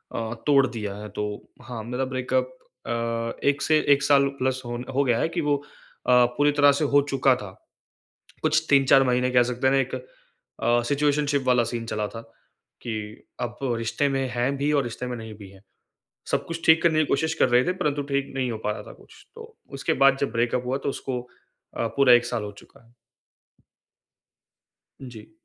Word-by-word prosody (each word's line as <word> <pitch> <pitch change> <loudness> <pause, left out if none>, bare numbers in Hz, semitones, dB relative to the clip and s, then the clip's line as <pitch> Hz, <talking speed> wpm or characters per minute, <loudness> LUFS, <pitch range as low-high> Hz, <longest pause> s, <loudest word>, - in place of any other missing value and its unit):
अ, 115 0 -3
तोड़ 140 -2 +5
दिया 105 -5 -5
है। 105 +1 -7
तो 105 - -4 0.4
हाँ, 120 -2 -7
मेरा 125 +3 -3
ब्रेकअप 130 0 -1 0.4
अ, 115 0 -3
1 140 0 +2
से 155 -1 +3
1 140 0 0
साल 140 -1 +4
प्लस 130 0 -1
होन 120 +1 -5
हो 140 - +3
गया 120 -3 +1
है - - +1
कि 170 0 -2
वो 145 -1 +1 0.5
अ, 125 -1 +6
पूरी 145 0 +4
तरह 145 -1 +5
से - - +2
हो 145 - +7
चुका 135 -1 +3
था। 105 -5 -8 0.9
कुछ 155 +1 +2
3-4 135 -1 +5
महीने 125 0 +1
कह 125 -1 +5
सकते 125 +2 -2
हैं 130 - +4
ना 135 - +4
एक 130 0 -3
अ, 120 -1 -4
सिचुएशनशिप 145 0 +1
वाला 125 -2 +3
सीन 115 -1 -4
चला 105 -2 -2
था, 115 - -8 0.6
कि 110 -2 -6 0.2
अब 120 0 -4 0.2
रिश्ते 115 +5 0
में 135 -1 -1
हैं 125 +3 -1
भी 145 +2 0
और 145 -2 +3
रिश्ते 120 +1 -5
में 125 - -4
नहीं 110 -2 -8
भी 100 -3 -11
हैं। 95 0 -17 0.7
सब - - 0
कुछ 165 0 -5
ठीक 160 0 +6
करने 160 -2 +3
की 155 - +3
कोशिश 160 +4 0
कर - - +5
रहे 125 +1 +4
थे, 180 - +1
परंतु 150 -5 -1
ठीक 140 -1 -1
नहीं 130 -2 -1
हो 110 - -4
पा 105 - +1
रहा - - -6
था - - -10
कुछ, - - -19
तो 460 -1 -12 0.2
उसके 135 - 0
बाद 135 0 +6
जब 140 - 0
ब्रेकअप 120 +1 0
हुआ 130 +2 -1
तो - - 0
उसको 130 -2 -4 0.6
अ, 115 - 0
पूरा 135 -3 +6
1 120 0 +5
साल 120 -3 -3
हो 105 - -6
चुका 115 - -20
है। 115 - -26 2.1
जी। 120 -5 -11
130 Hz, 205 wpm, -25 LUFS, 120-140 Hz, 2.1 s, हो